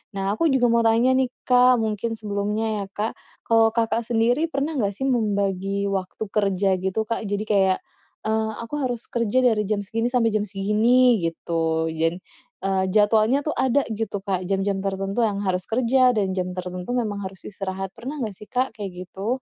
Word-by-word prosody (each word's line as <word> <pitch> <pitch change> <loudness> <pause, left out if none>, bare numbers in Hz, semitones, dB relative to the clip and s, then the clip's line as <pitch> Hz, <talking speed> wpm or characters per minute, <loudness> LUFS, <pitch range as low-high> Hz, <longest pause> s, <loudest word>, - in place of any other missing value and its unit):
Nah 195 - -2
aku 330 +11 +1
juga 250 -5 +3
mau 235 - +4
tanya 235 +3 +4
nih, 260 0 +3 0.2
Kak, 250 0 +5
mungkin 220 +1 -2
sebelumnya 210 +1 -2
ya, 200 - -3
Kak. 215 +2 -1 0.3
Kalau 225 0 +3
Kakak 230 0 0
sendiri 240 +7 +2
pernah 290 -1 -2
nggak 200 -3 0
sih 265 - -5
membagi 200 -5 0
waktu 195 +1 -2
kerja 200 -2 +1
gitu, 190 +4 -1
Kak? 220 -1 -3
Jadi 205 +1 -1
kayak, 195 -3 +2 0.5
eee, 220 0 0
"Aku 295 +6 -4
harus 245 -4 -2
kerja 235 +2 +1
dari 215 -4 +2
jam 205 -1 -1
segini 225 +3 -1
sampai 245 -3 +2
jam 210 0 0
segini," 210 +1 +3
gitu 165 -1 -1
jan 165 +1 0 0.4
eee, 195 -1 0
jadwalnya 215 +5 +4
tuh 305 - -2
ada 265 +2 +3
gitu, 210 -2 -3
Kak. 190 -3 -1
Jam-jam 195 0 0
tertentu 195 +3 -1
yang 200 -1 -2
harus 185 -1 0
kerja, 255 +2 +3
dan 195 -3 +1
jam 185 -1 -2
tertentu 180 +3 -5
memang 215 -4 -1
harus 190 -1 -8
istirahat. 195 -1 -4
Pernah 270 +6 -6
nggak 210 -3 -4
sih, 210 - -13
Kak, 250 -2 0
kayak 205 -3 -5 0.2
gitu? 195 +4 -7
215 Hz, 180 wpm, -23 LUFS, 195-235 Hz, 0.5 s, Kak